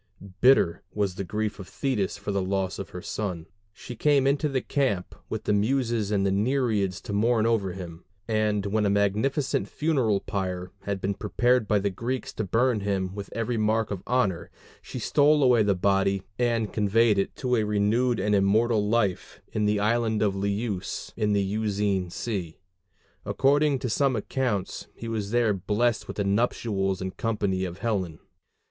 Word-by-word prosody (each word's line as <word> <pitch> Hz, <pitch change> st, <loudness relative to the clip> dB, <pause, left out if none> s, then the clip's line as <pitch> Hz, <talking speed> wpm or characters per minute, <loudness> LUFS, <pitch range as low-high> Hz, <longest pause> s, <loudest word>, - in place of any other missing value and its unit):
Bitter 125 Hz, -10 st, +4 dB
was 100 Hz, -3 st, -1 dB
the 95 Hz, -, -4 dB
grief 105 Hz, +3 st, -3 dB
of 95 Hz, -, -8 dB
Thetis 120 Hz, -10 st, -2 dB
for 100 Hz, +1 st, -4 dB
the 100 Hz, -1 st, 0 dB
loss 95 Hz, 0 st, -2 dB
of 100 Hz, -, -6 dB
her 90 Hz, -, -8 dB
son; 90 Hz, -7 st, -4 dB, 0.3 s
she 120 Hz, +3 st, -9 dB
came 140 Hz, +2 st, +3 dB
into 140 Hz, +2 st, +2 dB
the 135 Hz, -2 st, 0 dB
camp 125 Hz, -10 st, -1 dB, 0.2 s
with -, -, -4 dB
the 105 Hz, -, +1 dB
Muses 115 Hz, 0 st, +1 dB
and 100 Hz, -2 st, +1 dB
the 100 Hz, -, +2 dB
Nereids 105 Hz, -3 st, +1 dB
to 100 Hz, -, -6 dB
mourn 110 Hz, +2 st, +2 dB
over 105 Hz, -5 st, +1 dB
him; 85 Hz, -2 st, -8 dB, 0.2 s
and 105 Hz, -2 st, +1 dB
when 105 Hz, +2 st, 0 dB
a 100 Hz, -, +2 dB
magnificent 105 Hz, +8 st, +1 dB
funeral 130 Hz, -10 st, +1 dB
pile 90 Hz, -3 st, -3 dB, 0.2 s
had 100 Hz, -2 st, -2 dB
been 100 Hz, +1 st, 0 dB
prepared 120 Hz, +3 st, +1 dB
by 105 Hz, -, +3 dB
the 100 Hz, 0 st, 0 dB
Greeks 120 Hz, +5 st, -4 dB
to 110 Hz, -, -3 dB
burn 115 Hz, +4 st, +2 dB
him 95 Hz, -2 st, -2 dB
with 100 Hz, -1 st, -7 dB
every 115 Hz, +1 st, -1 dB
mark 110 Hz, 0 st, +1 dB
of 95 Hz, -3 st, -3 dB
honor, 120 Hz, -9 st, 0 dB, 0.3 s
she -, -, -8 dB
stole 150 Hz, 0 st, +3 dB
away 125 Hz, -3 st, +5 dB
the 100 Hz, -2 st, +2 dB
body 95 Hz, 0 st, +1 dB, 0.2 s
and 115 Hz, -3 st, 0 dB
conveyed 105 Hz, 0 st, +3 dB
it 95 Hz, -, -2 dB
to 125 Hz, -1 st, 0 dB
a 110 Hz, -, +2 dB
renewed 105 Hz, +4 st, +1 dB
and 105 Hz, +2 st, +1 dB
immortal 105 Hz, +2 st, +3 dB
life 105 Hz, -5 st, 0 dB
in 105 Hz, -1 st, +1 dB
the 105 Hz, 0 st, +2 dB
island 110 Hz, 0 st, +1 dB
of 100 Hz, -2 st, +1 dB
Leuce 100 Hz, 0 st, -3 dB
in 105 Hz, -2 st, +1 dB
the 100 Hz, -1 st, +2 dB
Euxine 100 Hz, -2 st, -1 dB
Sea. 90 Hz, -4 st, -4 dB, 0.7 s
According 145 Hz, +1 st, +2 dB
to 125 Hz, -, -3 dB
some 130 Hz, +3 st, +1 dB
accounts 110 Hz, -3 st, -2 dB
he 115 Hz, -, -7 dB
was 110 Hz, -3 st, -3 dB
there 115 Hz, -2 st, +2 dB
blest 105 Hz, +5 st, 0 dB
with -, -, -7 dB
the 100 Hz, -, +1 dB
nuptials 100 Hz, -2 st, 0 dB
and 95 Hz, 0 st, -5 dB
company 100 Hz, -4 st, -1 dB
of 90 Hz, -1 st, -6 dB
Helen. 95 Hz, -7 st, -2 dB
105 Hz, 180 wpm, -26 LUFS, 100-120 Hz, 0.7 s, away